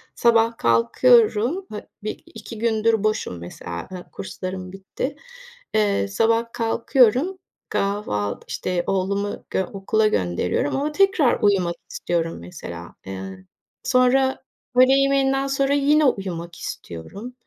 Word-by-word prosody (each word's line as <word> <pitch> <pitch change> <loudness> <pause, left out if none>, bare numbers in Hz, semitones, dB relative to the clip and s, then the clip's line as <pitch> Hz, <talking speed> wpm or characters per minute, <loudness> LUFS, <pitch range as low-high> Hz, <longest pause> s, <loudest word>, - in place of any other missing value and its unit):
sabah 230 -1 +3
kalkıyorum. 225 - +3
Ha, 210 - -7 0.2
1-2 220 +1 -7
gündür 225 -1 +2
boşum 215 - -1
mesela, 85 0 -7
e, 180 -1 -9
kurslarım 185 -1 -6
bitti. 195 +8 -5 0.6
Eee, 205 -2 +2
sabah 225 +3 +2
kalkıyorum. 250 - +2 0.3
Kahval 200 - -1
işte 180 -1 -2
oğlumu, 200 +2 -1
g 190 - 0
okula 210 +3 0
gönderiyorum 90 - 0
ama 290 +2 -1
tekrar 370 -7 +3
uyumak 185 -4 +2 0.2
istiyorum 165 -1 -2
mesela. 85 0 -9
Eee, 95 0 -7 0.4
sonra 265 +1 +3 0.3
öğle 255 +1 +6
yemeğinden 275 0 +2
sonra 275 0 +1
yine 290 +2 +4
uyumak 175 -8 -2
istiyorum. 195 - -8
215 Hz, 110 wpm, -23 LUFS, 175-255 Hz, 0.6 s, öğle